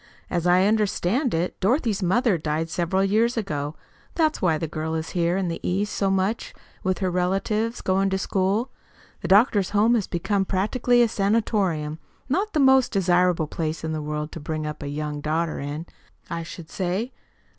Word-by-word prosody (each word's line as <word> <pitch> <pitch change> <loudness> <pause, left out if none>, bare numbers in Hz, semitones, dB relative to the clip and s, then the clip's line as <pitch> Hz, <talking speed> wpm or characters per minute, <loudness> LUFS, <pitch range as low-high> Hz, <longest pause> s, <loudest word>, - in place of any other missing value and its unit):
"As 175 -1 0
I 180 +2 +5
understand 215 - +1
it, 170 +2 -2
Dorothy's 220 - +1
mother 205 +4 +2
died 155 +2 -2
several 180 +3 +1
years 225 +5 +2
ago. 150 -8 -3 0.4
That's 315 -2 +1
why 165 -4 +2
the 165 - -3
girl 160 +1 -3
is 160 0 -3
here 175 0 +1
in 190 -2 -1
the 165 - -3
East 200 +3 -1
so 195 - 0
much 195 +4 -1 0.3
with 185 0 0
her 185 -2 -1
relatives, 195 +6 0
going 195 +1 +1
to 190 - 0
school. 195 +5 0 0.5
The - - -3
doctor's 205 -1 +4
home 215 +3 +3
has 220 -5 +1
become 195 +3 0
practically 240 +6 +2
a - - +3
sanatorium 195 -8 0 0.3
not 380 +11 0
the 310 - +1
most 265 -2 +5
desirable 180 -4 +2
place 155 +1 -4
in 160 0 -2
the 155 - -3
world 150 +1 -4
to - - -7
bring 155 0 -4
up 150 0 -5
a 145 - -5
young 150 0 -4
daughter 160 +2 -1
in, 145 +3 -5 0.5
I 170 0 -2
should 165 0 -9
say. 190 +7 -2
185 Hz, 180 wpm, -24 LUFS, 160-215 Hz, 0.5 s, I